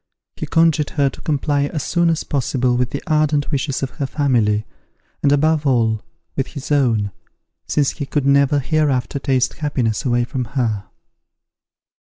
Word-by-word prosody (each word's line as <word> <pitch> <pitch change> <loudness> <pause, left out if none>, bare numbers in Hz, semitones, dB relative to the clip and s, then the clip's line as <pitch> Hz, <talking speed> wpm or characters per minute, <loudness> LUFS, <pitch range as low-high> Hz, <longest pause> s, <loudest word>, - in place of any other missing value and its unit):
He - - -5
conjured 160 -3 +3
her 140 -2 +3
to - - -13
comply 145 -1 0
as 150 0 -3
soon 170 -1 +2
as 165 -1 0
possible 130 -2 0
with 125 0 0
the 140 - -5
ardent 150 -2 +1
wishes 140 -1 -1
of 135 - -2
her 140 - -3
family, 115 -7 +1 0.6
and 140 - +3
above 150 +1 +2
all, 115 -4 +2 0.3
with 135 - -1
his 140 -1 -8
own, 115 -8 +2 0.6
since 145 -2 +1
he 145 -3 -6
could 145 -2 -1
never 140 +1 +4
hereafter 140 -2 0
taste 130 -2 +1
happiness 130 -7 -1
away 120 -3 +1
from 125 +1 -3
her. 110 -5 0
140 Hz, 155 wpm, -20 LUFS, 125-150 Hz, 0.6 s, never